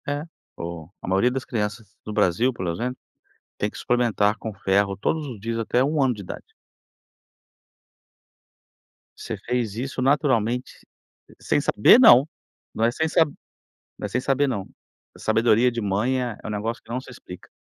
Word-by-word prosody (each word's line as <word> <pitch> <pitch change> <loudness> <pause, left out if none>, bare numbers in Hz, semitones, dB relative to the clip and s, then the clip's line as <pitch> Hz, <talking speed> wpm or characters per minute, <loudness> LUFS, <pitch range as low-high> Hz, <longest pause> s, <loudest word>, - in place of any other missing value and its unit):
É, 145 +1 -2 0.3
o 85 -2 -7
a - - -8
maioria 95 +6 +3
das 130 0 -4
crianças 105 -2 -4
do 105 - -5
Brasil, 105 +4 +2
pelo 90 -6 -3
exemplo, 125 +9 -3 0.6
tem 105 - -1
que - - -12
suplementar 115 -4 +1
com 110 - -6
ferro 100 0 +1
todos 155 +9 -1
os 120 -6 -8
dias 115 +3 -3
até 120 +3 +1
1 150 +2 +1
ano 130 -2 +3
de 105 - -9
idade. 95 - -9 2.6
Você - - -5
fez 120 -4 -1
isso 130 +2 -4
naturalmente, 125 -3 +1 0.6
sem - - +1
saber 165 - +6
não, 140 - +8 0.5
não 115 - +1
é 115 - +3
sem 160 +6 -1
sab 160 -1 +3 0.7
não - - -5
é - - -1
sem 125 - -1
saber 135 +2 +1
não, 100 -8 -3 0.5
sabedoria 115 +2 +3
de 120 0 -3
mãe 110 +6 0
é 120 -4 -4
é - - -6
um - - -4
negócio 110 +3 -3
que - - -23
não 120 +2 -2
se 130 - -13
explica. 90 -7 -12
115 Hz, 170 wpm, -24 LUFS, 105-130 Hz, 2.6 s, não